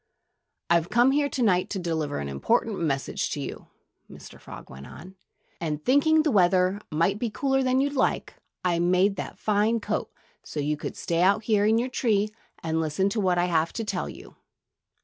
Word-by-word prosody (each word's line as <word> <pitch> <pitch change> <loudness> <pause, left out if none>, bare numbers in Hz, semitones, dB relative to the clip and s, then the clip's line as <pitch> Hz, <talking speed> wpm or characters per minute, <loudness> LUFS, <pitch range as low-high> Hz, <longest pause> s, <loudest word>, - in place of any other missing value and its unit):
"I've 170 0 +2
come 240 +3 +4
here 285 0 +1
to 260 - -1
night 185 -4 +2
to 205 - -3
deliver 160 -5 -2
an 70 - -4
important 215 - 0
message 140 -5 -1
to - - -4
you," - - -7 0.4
Mr. - - -13
Frog - - -11
went 65 +1 -11
on. 190 +2 -12 0.4
"And 155 -2 -4
thinking 310 +4 +4
the 305 - +1
weather 185 0 +3
might 170 +7 0
be 235 - -1
cooler 270 +4 0
than 255 0 +2
you 280 +1 +1
liked, 280 - 0 0.3
I 175 -2 +1
made 180 +3 +3
you - - -9
that - - -6
fine 215 +2 +1
coat - - -3 0.3
so 150 - -7
you 150 +1 0
could 150 - -7
stay 170 0 -1
out 200 +4 +3
here 210 -2 +2
in 220 +1 +4
your 240 +2 0
tree 215 -5 +1 0.3
and 160 0 0
listen 160 +5 0
to 215 - -2
what 185 -3 +1
I 175 - +2
have 165 -2 +1
to 225 - -3
tell 215 - -3
you.... - - -12
195 Hz, 200 wpm, -26 LUFS, 170-230 Hz, 0.4 s, come